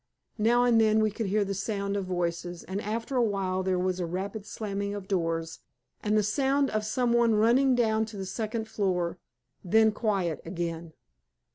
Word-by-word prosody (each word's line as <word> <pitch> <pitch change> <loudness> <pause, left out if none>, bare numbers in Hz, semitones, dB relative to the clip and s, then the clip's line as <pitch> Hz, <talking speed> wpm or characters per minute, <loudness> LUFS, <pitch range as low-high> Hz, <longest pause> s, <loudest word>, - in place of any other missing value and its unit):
Now 240 +3 +4
and 235 -2 +4
then 220 0 +4
we 215 -1 +2
could 215 +1 -3
hear 205 +1 +1
the 195 - -2
sound 200 0 -2
of 200 -2 -2
voices, 175 -1 -3
and 195 +2 -4
after 230 +5 -3
a 245 - +4
while 195 -3 0
there 185 -1 0
was 185 0 -1
a 180 - -1
rapid 195 +4 -4
slamming 200 -1 -3
of 200 -2 -7
doors 165 -3 -1 0.4
and 210 0 +1
the 210 - +3
sound 270 +6 +1
of 215 0 0
some 235 +3 0
one 235 -2 +4
running 245 +5 +4
down 220 -2 +2
to 215 -1 -10
the 190 - -4
second 220 +3 -3
floor. 180 -5 -1 0.4
Then 220 +4 +4
quiet 195 -7 -1
again. 165 -1 -4
205 Hz, 185 wpm, -28 LUFS, 185-220 Hz, 0.4 s, Now